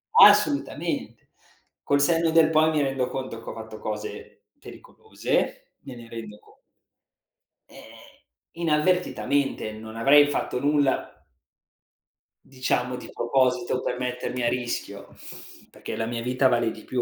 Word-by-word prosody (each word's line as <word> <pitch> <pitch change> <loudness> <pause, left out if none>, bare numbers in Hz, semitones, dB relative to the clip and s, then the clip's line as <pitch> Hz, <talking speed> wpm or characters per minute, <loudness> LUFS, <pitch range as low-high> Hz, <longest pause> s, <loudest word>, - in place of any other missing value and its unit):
Assolutamente. 300 -10 +3 0.5
Col 140 - +2
senno 165 +3 +2
del 160 -1 +5
poi 155 0 +4
mi 155 -2 +1
rendo 135 -2 -1
conto 130 -3 -6
che - - -8
ho - - -6
fatto 110 -1 -9
cose 105 -1 -7
pericolose, - - -4
me 130 - -10
ne 120 -1 -12
rendo 110 -2 -9
con - - -22 1.2
ehm, - - -14 0.7
inavvertitamente. 150 -6 0
Non 110 +1 -10
avrei 145 +5 +6
fatto 140 -3 -2
nulla 145 -1 0 1.2
diciamo 125 -1 -2
di - - -10
proposito 125 0 0
per - - -3
mettermi 125 0 -3
a 120 - +3
rischio, 120 -5 -5 0.5
perché - - -8
la 115 - -2
mia 115 0 -4
vita 125 +2 +2
vale 120 -2 +1
di 110 - -11
più 125 -1 -2
125 Hz, 130 wpm, -25 LUFS, 115-145 Hz, 1.2 s, avrei